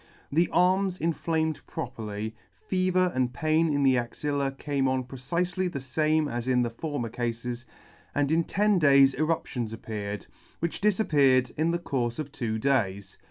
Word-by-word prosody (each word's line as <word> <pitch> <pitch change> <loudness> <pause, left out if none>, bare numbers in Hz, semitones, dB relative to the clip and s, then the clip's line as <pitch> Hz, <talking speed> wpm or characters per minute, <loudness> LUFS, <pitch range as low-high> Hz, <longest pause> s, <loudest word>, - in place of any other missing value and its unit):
The 165 +4 +3
arms 185 +1 +3
inflamed 160 -1 -1
properly, 110 -7 -5 0.3
fever 185 -1 +2
and 125 -1 0
pain 155 +3 +1
in 145 -1 +1
the 130 -2 +4
axilla 140 +3 -2
came 135 0 -1
on 130 0 0
precifely 170 +9 -2
the 140 - -4
fame 155 +4 +1
as 120 -2 -4
in 125 -1 +3
the 120 - -2
former 145 0 -3
cafes, 120 +1 -4 0.5
and 145 0 +1
in 165 +1 +3
ten 205 -1 +2
days 140 -3 +6
eruptions 135 -7 -1
appeared, 105 -2 -5 0.3
which 170 0 -3
difap 210 +1 +2
peared 130 -4 +4
in 160 +2 +1
the 170 - +1
courfe 125 -8 -2
of 145 -2 -5
two 115 -5 -2
days. 110 -6 -1
140 Hz, 160 wpm, -27 LUFS, 120-165 Hz, 0.5 s, days